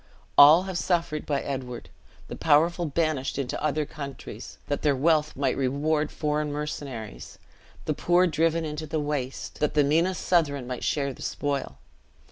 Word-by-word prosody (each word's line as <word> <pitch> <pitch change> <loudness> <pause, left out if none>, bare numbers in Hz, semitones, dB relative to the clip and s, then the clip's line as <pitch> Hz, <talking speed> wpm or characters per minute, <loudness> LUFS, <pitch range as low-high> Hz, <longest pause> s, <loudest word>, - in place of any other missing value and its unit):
All 155 +5 +9
have 190 -2 -3
suffered 170 -4 -1
by 140 -2 0
Edward; 130 -3 -5 0.4
the - - -6
powerful 165 +3 +3
banished 155 -4 -1
into 135 -3 -3
other 155 0 0
countries, 140 -2 -8
that 145 - -2
their 145 -2 +2
wealth 150 +2 +2
might 135 -1 0
reward 145 +4 0
foreign 150 -1 -1
mercenaries; 140 -7 -6 0.5
the 155 - 0
poor 175 +4 +3
driven 165 0 +1
into 155 +1 -5
the 155 +1 -1
waste, 145 -3 -4
that 150 0 0
the 150 - +5
meanest 165 +6 +1
Southron 145 -7 +2
might 125 0 -5
share 140 -2 0
the - - -14
spoil! 140 - -3
150 Hz, 155 wpm, -26 LUFS, 140-160 Hz, 0.5 s, All